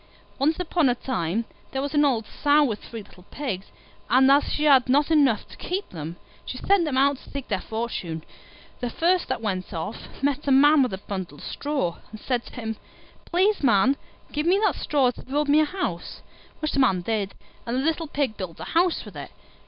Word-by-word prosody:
Once 310 +5 +2
upon 335 -5 +2
a 245 - +2
time 225 -4 -2 0.3
there 265 - -2
was 285 +1 -3
an 295 -1 +4
old 245 -6 +2
Sow 295 +6 +3
with 220 -7 -2
three 225 -2 -8
little 180 -2 -18
Pigs, 240 -10 -4 0.4
and 265 +2 +6
as 285 +1 +5
she 300 - -2
had 270 -4 +5
not 290 +4 +3
enough 275 -9 +3
to - - -13
keep 380 +3 -3
them, 165 0 -6 0.3
she 255 - -6
sent 390 +4 +3
them 280 -4 -1
out 280 +1 +4
to - - -16
seek 280 -2 -6
their 200 -4 0
fortune. 205 -8 -4 0.6
The 245 - -2
first 350 +7 +1
that - - -3
went 185 -4 -2
off 165 +10 -7
met 285 0 0
a - - +3
Man 290 +2 +6
with 250 -6 +1
a - - -9
bundle 190 -6 -6
of - - -12
straw, 280 - -2
and 215 - -10
said 245 0 -1
to - - -12
him, 225 -3 -4 0.5
"Please, 385 +4 +2
Man, 235 0 +4 0.4
give 300 +2 -1
me 375 +3 +4
that - - +3
straw 270 -4 +1
to - - -12
build 290 +3 -1
me 290 +2 +5
a 310 - +4
house"; 295 - -4 0.4
which 310 - -1
the - - 0
Man 195 -9 +3
did, 205 0 -2 0.3
and 235 +2 -1
the - - +1
little 325 0 0
Pig 280 -6 -1
built 185 -4 -6
a - - -5
house 345 +1 +2
with - - -11
it. - - -7
265 Hz, 215 wpm, -25 LUFS, 215-295 Hz, 0.6 s, and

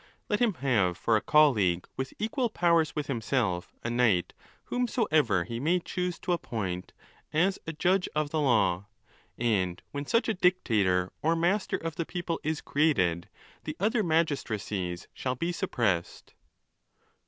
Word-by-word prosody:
Let 210 - +1
him 235 -6 +2
have 110 - +1
for 115 - +2
a 105 - +2
colleague, 110 - +3
with 130 0 -4
equal 240 +3 -1
powers 170 -6 +2
with 150 -2 -2
himself, 115 -8 -1
a, 120 - -2
knight 115 -8 +2 0.3
whomsoever 155 - +1
he 115 +6 -5
may 170 +7 +2
choose 180 0 -3
to - - -2
appoint, 95 - -3 0.4
as 185 +5 +2
a 165 - -3
judge 180 +4 +1
of 150 -1 0
the 155 - 0
law. 100 -9 +2 0.5
And 95 -7 0
when 140 0 -5
such 230 +1 +2
a 225 - +2
dictator 105 - +2
or 165 +2 +2
master 180 +5 +1
of 165 -1 -5
the 170 - -1
people 175 -2 -3
is 155 0 -1
created 90 - +1 0.3
the - - -5
other 215 +4 +2
magistracies 110 - -1
shall 130 -1 -2
be 170 +7 -2
suppressed. 115 - -2
145 Hz, 150 wpm, -28 LUFS, 105-175 Hz, 0.5 s, colleague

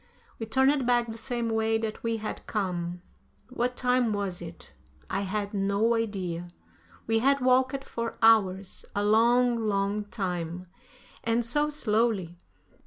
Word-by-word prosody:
We 225 - -4
turned 265 +3 +2
back 240 -1 +3
the - - -7
same 235 0 -2
way 225 0 +1
that 220 -1 -4
we 230 -1 -1
had 215 0 -6
come. 180 -4 -3 0.5
What 250 0 -1
time 250 -3 +2
was 195 -4 -3
it? 165 -1 -10 0.4
I 195 - 0
had 200 +1 -3
no 200 +3 +2
idea. 190 -7 -2 0.6
We 225 0 +2
had 275 +4 +3
walked 260 +1 +2
for 230 -3 -5
hours, 200 -4 +3
a 205 - +1
long, 235 +3 +4
long 200 +1 0
time, 180 -3 -4 0.6
and 230 +1 +1
so 295 +6 +1
slowly. 215 - 0
220 Hz, 140 wpm, -28 LUFS, 195-240 Hz, 0.6 s, long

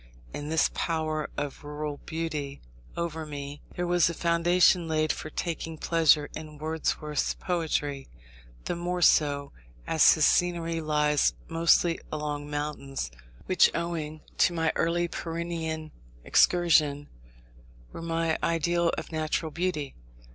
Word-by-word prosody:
In 145 +1 -5
this 160 0 +2
power 155 -2 -1
of 145 +1 -4
rural 150 0 -5
beauty 155 -4 -4 0.4
over 160 -2 -3
me, 145 -1 -7
there 175 - -1
was 175 -1 +3
a 170 - -4
foundation 170 +1 +3
laid 155 -1 +1
for 155 - -7
taking 165 0 -4
pleasure 155 -3 +3
in 155 -1 -8
Wordsworth's 155 -1 -1
poetry; 150 -6 -2 0.6
the - - -2
more 175 +1 -2
so, 140 -3 +3 0.3
as 160 - +6
his 155 -2 +3
scenery 170 -2 +1
lies 150 -1 +2
mostly 165 +1 +3
among 150 -1 -3
mountains, 145 - -4 0.3
which, 185 - +5
owing 160 -2 -3 0.2
to 175 - +4
my 160 -1 +1
early 175 +1 +1
Pyrenean 165 -2 -4 0.3
excursion, 155 -5 +3 0.9
were - - -7
my 165 -1 0
ideal 170 +1 +1
of 160 - -6
natural 155 0 -1
beauty. 165 -4 -2
160 Hz, 125 wpm, -28 LUFS, 150-170 Hz, 0.9 s, as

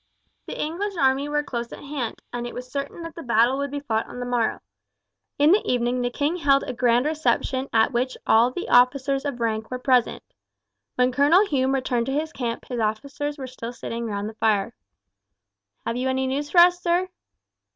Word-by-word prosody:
The - - -6
English 370 +6 -3
army 275 0 +2
were 295 0 0
close 235 -4 -5
at - - -9
hand, 280 -5 -5
and 240 0 -3
it - - -9
was 250 0 -8
certain 280 +5 -5
that 330 -1 -7
the 335 - -8
battle 240 +1 +2
would 280 0 -2
be 285 +1 -5
fought 225 -6 -1
on 245 - -9
the 245 - -3
morrow. 245 -2 0 0.8
In 295 +2 +5
the 400 - +6
evening 245 0 0
the 245 - 0
king 295 +7 -1
held 275 -4 +3
a 255 - -4
grand 245 +1 +2
reception 270 -3 0
at 225 +2 +3
which 255 +2 -1
all 230 +2 +5
the 305 +8 -5
officers 270 +2 +3
of 280 -4 -3
rank 220 -1 -1
were 255 - -3
present. 250 -2 +1 0.7
When 250 0 +2
Colonel 295 +10 +4
Hume 270 -6 +1
returned 245 -3 -1
to 270 - -1
his 315 +3 -2
camp 235 -2 -4
his 245 -2 -4
officers 280 +7 -2
were 270 - -6
still 245 -2 -7
sitting 235 -1 -5
round 205 -1 -3
the 220 - -7
fire. 220 0 +1 1.1
"Have 230 - -2
you 255 +1 -1
any 265 0 0
news 280 +3 -2
for 345 +2 +6
us, 355 0 +5
sir?" 350 +1 +1
260 Hz, 205 wpm, -24 LUFS, 240-290 Hz, 1.1 s, the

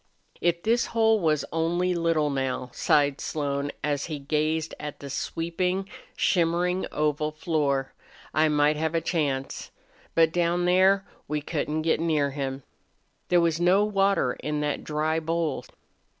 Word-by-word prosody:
"If 170 0 +1
this 235 +2 +2
hole 220 -1 +4
was 155 -5 +1
only 175 +3 +1
little, 165 -3 +1
now," 130 -2 -2
sighed 145 -1 +2
Slone, 140 -1 -2
as 145 -1 0
he 155 -3 -4
gazed 155 +3 -1
at 150 -1 -6
the 140 -1 -8
sweeping, 180 +6 -2 0.3
shimmering 180 +1 +1
oval 150 0 0
floor, 150 -4 -1 0.4
"I 155 +1 +3
might 150 0 +3
have 160 +1 -1
a - - +3
chance. 145 -5 -2 0.5
But 165 -1 +5
down 175 0 +1
there 190 +2 +4 0.2
we 150 +1 -1
couldn't 150 +1 -2
get 160 -1 +2
near 155 -4 +1
him." 135 -1 -4 0.6
There 175 -1 +4
was 165 0 +1
no 190 +4 +4
water 195 -10 +2
in 150 0 -2
that 150 -1 -2
dry 155 +1 0
bowl. 165 0 -2
160 Hz, 145 wpm, -26 LUFS, 145-175 Hz, 0.6 s, But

